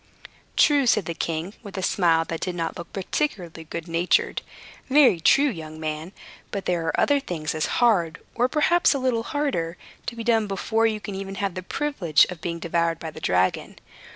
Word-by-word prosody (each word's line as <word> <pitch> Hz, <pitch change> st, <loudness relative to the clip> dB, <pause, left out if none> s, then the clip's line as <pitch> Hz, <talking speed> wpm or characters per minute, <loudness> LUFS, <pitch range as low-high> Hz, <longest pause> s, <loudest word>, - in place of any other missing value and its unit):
"True," 285 Hz, -3 st, +5 dB
said 210 Hz, -5 st, +3 dB
the 170 Hz, -, -3 dB
king, 165 Hz, +3 st, -3 dB
with 200 Hz, -4 st, -9 dB
a 190 Hz, -, -2 dB
smile 165 Hz, -4 st, +3 dB
that 165 Hz, 0 st, -4 dB
did 180 Hz, -2 st, -2 dB
not 165 Hz, -1 st, -3 dB
look 170 Hz, -1 st, -9 dB
particularly 180 Hz, -, -3 dB
good 165 Hz, +1 st, -6 dB
natured. 170 Hz, +2 st, +1 dB, 0.5 s
"Very 260 Hz, -, +5 dB
true, 275 Hz, -, +5 dB
young 155 Hz, -, -6 dB
man. 155 Hz, +2 st, -4 dB, 0.4 s
But 200 Hz, -2 st, -4 dB
there 170 Hz, -2 st, 0 dB
are -, -, 0 dB
other 285 Hz, -1 st, +3 dB
things 165 Hz, -, -4 dB
as 155 Hz, -1 st, -1 dB
hard, 185 Hz, -10 st, +2 dB
or 245 Hz, +1 st, +2 dB
perhaps 310 Hz, +2 st, +3 dB
a -, -, +1 dB
little 255 Hz, -3 st, 0 dB
harder, 230 Hz, -, -2 dB, 0.3 s
to 235 Hz, -, -3 dB
be 230 Hz, -, -5 dB
done 225 Hz, -2 st, +2 dB
before 220 Hz, +3 st, +1 dB
you 215 Hz, -1 st, -1 dB
can 200 Hz, 0 st, -7 dB
even 195 Hz, 0 st, -5 dB
have 195 Hz, -1 st, -2 dB
the 185 Hz, -, -5 dB
privilege 185 Hz, -, +2 dB
of 175 Hz, -3 st, -8 dB
being 170 Hz, 0 st, -3 dB
devoured 170 Hz, 0 st, 0 dB
by 160 Hz, -1 st, -6 dB
the -, -, -11 dB
dragon. 90 Hz, +1 st, 0 dB
180 Hz, 195 wpm, -24 LUFS, 165-230 Hz, 0.5 s, True